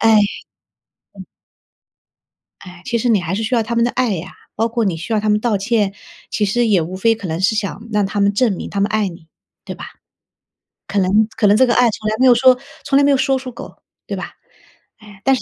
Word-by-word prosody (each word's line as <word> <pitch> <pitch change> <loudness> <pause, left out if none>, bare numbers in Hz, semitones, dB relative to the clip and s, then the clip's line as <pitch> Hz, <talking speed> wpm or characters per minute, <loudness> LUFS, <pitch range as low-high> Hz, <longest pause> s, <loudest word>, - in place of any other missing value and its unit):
哎， 225 -1 +5 1.0
嗯。 - - -11 1.4
哎， 180 -2 -12
其 240 -2 -1
实 240 +2 0
你 215 -4 +4
还 170 +2 -3
是 210 - -2
需 245 +3 0
要 230 - +2
他 235 +2 -4
们 235 - +3
的 240 - +2
爱 245 -5 0
呀。 180 +2 -7 0.2
包 225 +2 +1
括 230 -1 -1
你 180 -4 0
需 165 +8 -7
要 215 - +2
他 215 0 -1
们 210 - +3
道 215 -2 0
歉， 205 -1 0 0.4
其 210 - 0
实 235 +4 +1
也 195 -5 +3
无 175 +4 -5
非 225 +4 +2
可 200 -4 -7
能 160 0 -3
是 205 +3 +2
想 215 +2 -4
让 210 -2 +1
他 205 +1 -3
们 200 0 +3
证 225 0 +2
明 - - -6
他 200 - -3
们 200 - +2
爱 215 -2 +1
你， 170 -2 -10 0.4
对 - - -6
吧？ - - -9 1.0
可 200 +1 -1
能 205 +4 +3
可 210 - +2
能 205 +1 +5
这 260 - +5
个 240 - +1
爱 245 -1 +4
从 215 0 -5
来 215 - -1
没 260 - +4
有 245 - +7
说， 255 +1 +5 0.2
从 275 - +2
来 285 - +4
没 285 - +4
有 275 - +4
说 265 0 +1
出口， 255 -2 -10 0.2
对 - - -4
吧？ - - -7 0.6
哎， 205 -3 -16
但 270 - +4
是 - - -5
215 Hz, 265 characters per minute, -18 LUFS, 195-235 Hz, 1.4 s, 有